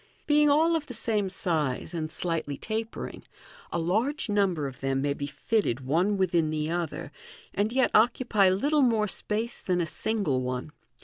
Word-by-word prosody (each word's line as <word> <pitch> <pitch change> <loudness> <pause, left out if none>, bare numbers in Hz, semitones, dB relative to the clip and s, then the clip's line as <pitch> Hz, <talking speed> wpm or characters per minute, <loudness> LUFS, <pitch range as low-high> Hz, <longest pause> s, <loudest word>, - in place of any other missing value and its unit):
Being 295 0 +4
all 320 +3 +4
of 310 -2 -2
the 250 - -7
same 210 -3 0
size, 160 -5 -1
and 160 -2 -3
slightly 160 -4 -3
tapering, 220 +4 -5 0.5
a - - -1
large 220 - 0
number 195 -7 +1
of 130 -2 -6
them 135 0 0
may 140 +1 0
be 140 0 -5
fitted 145 - -1
one 170 +10 +1
within 170 -4 +2
the 155 0 -2
other, 170 -3 -3 0.4
and 205 +2 0
yet 260 0 +2
occupy 220 -3 +4
little 285 +11 +2
more 225 -5 +3
space 220 +4 0
than 180 -1 0
a 170 - +1
single 170 -6 -1
one. 125 +3 -4
190 Hz, 170 wpm, -27 LUFS, 155-225 Hz, 0.5 s, Being